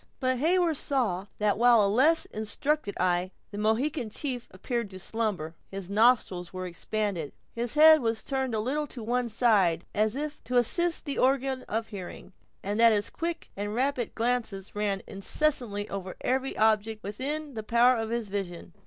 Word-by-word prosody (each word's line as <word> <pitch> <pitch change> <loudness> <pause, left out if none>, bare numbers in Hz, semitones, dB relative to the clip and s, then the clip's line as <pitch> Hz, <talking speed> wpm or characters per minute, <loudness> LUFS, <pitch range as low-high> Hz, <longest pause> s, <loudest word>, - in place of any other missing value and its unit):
But 255 -2 0
Heyward 335 +1 +2
saw 210 -11 0
that 210 0 +1
while 240 0 +6
to - - +4
a - - +3
less 305 +8 +4
instructed 220 +2 -2
eye 180 0 +1 0.2
the 205 - -6
Mohican 230 +4 0
chief 250 +1 -4
appeared 230 +3 -3
to 190 - -10
slumber, 195 -6 -2 0.2
his 195 -1 -7
nostrils 205 -5 +3
were 185 0 -5
expanded, 180 -2 -3 0.2
his 235 +3 -2
head 315 +1 +8
was 225 -1 -1
turned 265 -3 -2
a - - 0
little 290 +7 -1
to 245 -4 -7
one 240 +1 0
side, 205 -8 +2
as 215 +2 +1
if 295 +1 -5
to 250 - 0
assist 340 +9 +2
the 285 -2 -3
organs 265 0 +1
of 225 +1 -1
hearing, 190 -2 -9 0.3
and 205 +3 -2
that 230 0 +7
his 205 -1 0
quick 335 0 -4
and 205 +1 -4
rapid 255 -1 -1
glances 225 -5 -1
ran 205 -2 -1
incessantly 210 -1 0
over 190 -2 -5
every 265 +1 -1
object 220 0 +2
within 280 +8 -4
the 220 - -4
power 235 +3 +4
of 225 -1 -3
his 235 -2 -2
vision. 185 -3 -5
225 Hz, 175 wpm, -28 LUFS, 205-260 Hz, 0.3 s, head